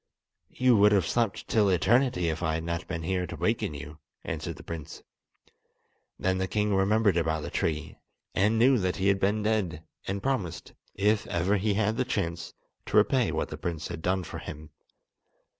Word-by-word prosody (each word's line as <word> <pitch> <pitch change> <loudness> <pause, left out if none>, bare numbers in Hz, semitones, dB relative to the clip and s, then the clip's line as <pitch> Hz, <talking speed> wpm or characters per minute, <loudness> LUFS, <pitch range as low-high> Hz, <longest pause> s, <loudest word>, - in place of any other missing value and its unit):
"You 130 -1 +4
would 105 +1 +6
have 95 -5 +3
slept 115 0 -1
till 105 -3 +3
eternity 95 +1 +2
if 80 +1 -3
I 80 -2 0
had 80 - -3
not 85 +1 -3
been 85 -2 -4
here 90 +1 -1
to - - -6
waken 75 - -1
you"; 75 +2 -9 0.2
answered 80 +1 -4
the - - -12
prince. 80 -3 -7 1.1
Then 95 0 0
the 95 - 0
king 105 +1 0
remembered 100 +1 +3
about 80 -2 0
the - - -6
tree, 80 -2 -2 0.3
and 105 +3 +2
knew 125 +2 +5
that 90 -2 0
he 95 +1 +1
had 100 0 +2
been 105 +2 +1
dead, 100 -7 0 0.2
and 100 +1 -3
promised, 115 -12 -2 0.2
if 105 +2 +1
ever 90 +4 +1
he 100 +1 0
had 110 +1 +1
the - - +2
chance, 85 -9 -3 0.3
to - - +1
repay - - +3
what - - -2
the - - -7
prince 85 -2 -4
had 85 -2 -6
done 95 +2 0
for - - -7
him. 75 0 -9
95 Hz, 190 wpm, -28 LUFS, 85-105 Hz, 1.1 s, would